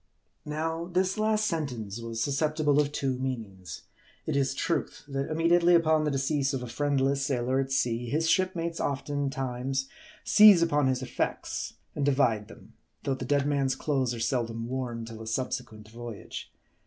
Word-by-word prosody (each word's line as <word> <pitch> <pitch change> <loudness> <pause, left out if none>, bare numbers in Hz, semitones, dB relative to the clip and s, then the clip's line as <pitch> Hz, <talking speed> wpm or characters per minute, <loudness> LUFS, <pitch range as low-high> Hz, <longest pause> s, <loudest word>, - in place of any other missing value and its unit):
Now, 160 +2 -2
this 185 +3 0
last 215 0 +2
sentence 120 - -3
was 115 -1 -5
susceptible 150 0 +2
of 145 0 -2
two 135 -3 -1
meanings. 105 -9 -5 0.4
It 155 - -1
is 135 -1 +1
truth, 170 +4 -2
that 135 -1 -3
immediately 170 +2 +4
upon 160 -2 +3
the - - +2
decease 135 0 0
of 125 - -3
a - - -5
friendless 140 +2 +1
sailor 130 -1 0
at 135 0 -2
sea, 120 -3 0
his 160 +4 +1
shipmates 170 -2 +1
oftentimes 135 -2 -2 0.3
seize 210 -5 +8
upon 150 -4 +2
his 130 0 0
effects, - - -3 0.2
and 145 - -1
divide 125 -7 +2
them; - - -15 0.3
though 135 - 0
the 130 -1 -5
dead 140 +1 +2
man's 140 -2 +1
clothes 130 -5 0
are - - -6
seldom 115 -1 -1
worn 120 -3 -3
till 115 -1 -9
a 110 - -8
subsequent 110 -2 -3
voyage. 115 -2 -8
135 Hz, 160 wpm, -28 LUFS, 125-155 Hz, 0.4 s, seize